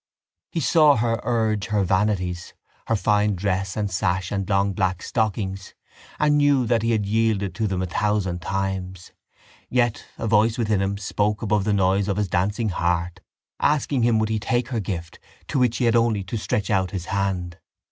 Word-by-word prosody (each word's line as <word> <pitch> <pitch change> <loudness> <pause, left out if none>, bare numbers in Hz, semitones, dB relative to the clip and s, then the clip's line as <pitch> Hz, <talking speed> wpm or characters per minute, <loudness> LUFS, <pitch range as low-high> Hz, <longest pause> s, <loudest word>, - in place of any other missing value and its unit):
He 165 - -2
saw 155 0 +5
her 115 0 0
urge 110 -3 0
her 105 -3 +1
vanities, 95 -2 -1 0.3
her 115 - +2
fine 105 -1 +2
dress 95 +1 -2
and 105 -2 -1
sash 95 -1 -1
and 100 -1 -2
long 100 0 +2
black 95 -1 -1
stockings, 100 -4 -2 0.4
and 150 -1 +3
knew 140 -3 +3
that 115 -1 +1
he 115 - 0
had 110 -3 +1
yielded 105 -3 0
to 110 +5 -1
them 95 -2 -1
a - - -1
thousand 95 -1 -1
times. 95 -1 -4 0.6
Yet 120 -2 0
a - - -4
voice 110 +2 +3
within 110 -4 +1
him 100 +1 -1
spoke 105 +2 -1
above 105 -2 +1
the 110 - +1
noise 95 0 +2
of 100 -1 -1
his 105 -2 -1
dancing 100 +5 0
heart, 85 0 -1 0.4
asking 145 -3 +1
him 115 -1 +3
would 110 0 0
he 110 -1 0
take 120 +3 -1
her 120 -4 -1
gift 90 -5 -5 0.3
to 140 - 0
which 125 -2 +2
he 125 - +1
had 115 0 +3
only 115 -4 +2
to 95 +5 -6
stretch 105 -2 -2
out 95 -2 +1
his 90 -1 -5
hand. 95 -3 -2
105 Hz, 190 wpm, -23 LUFS, 95-115 Hz, 0.6 s, saw